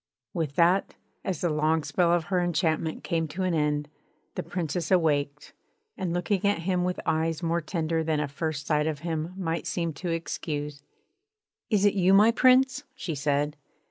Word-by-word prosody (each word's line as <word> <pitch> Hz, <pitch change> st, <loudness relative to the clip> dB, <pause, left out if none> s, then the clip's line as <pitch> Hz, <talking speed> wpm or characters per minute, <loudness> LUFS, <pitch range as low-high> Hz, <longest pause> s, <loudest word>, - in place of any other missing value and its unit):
With 160 Hz, -6 st, -2 dB
that, 175 Hz, +3 st, +3 dB, 0.3 s
as 190 Hz, 0 st, -3 dB
the 175 Hz, -3 st, +1 dB
long 155 Hz, +1 st, +1 dB
spell 175 Hz, +1 st, +2 dB
of 175 Hz, -1 st, +2 dB
her 180 Hz, -, +3 dB
enchantment 160 Hz, -2 st, 0 dB
came 165 Hz, -2 st, -1 dB
to 175 Hz, +5 st, -4 dB
an 185 Hz, -1 st, +1 dB
end, 150 Hz, -2 st, 0 dB, 0.5 s
the -, -, -3 dB
Princess 170 Hz, -1 st, -3 dB
awaked; 145 Hz, -5 st, +1 dB, 0.4 s
and 180 Hz, -, -3 dB
looking 175 Hz, +2 st, 0 dB
at 200 Hz, -4 st, +1 dB
him 180 Hz, 0 st, +1 dB
with 180 Hz, 0 st, -1 dB
eyes 160 Hz, +1 st, 0 dB
more 170 Hz, +1 st, +1 dB
tender 165 Hz, 0 st, -1 dB
than 155 Hz, -1 st, 0 dB
a 150 Hz, -, -1 dB
first 145 Hz, 0 st, -4 dB
sight 150 Hz, -1 st, +1 dB
of 150 Hz, -2 st, -3 dB
him 165 Hz, +1 st, -3 dB
might 165 Hz, -3 st, -2 dB
seem 170 Hz, -2 st, -1 dB
to 175 Hz, +5 st, -5 dB
excuse: 150 Hz, -3 st, -3 dB, 0.9 s
'Is 210 Hz, -3 st, +3 dB
it 205 Hz, -, +4 dB
you, 190 Hz, 0 st, +4 dB
my 215 Hz, +3 st, +7 dB
Prince?' 260 Hz, +3 st, +4 dB
she 185 Hz, -10 st, -4 dB
said. 145 Hz, +1 st, 0 dB
165 Hz, 175 wpm, -27 LUFS, 155-180 Hz, 0.9 s, my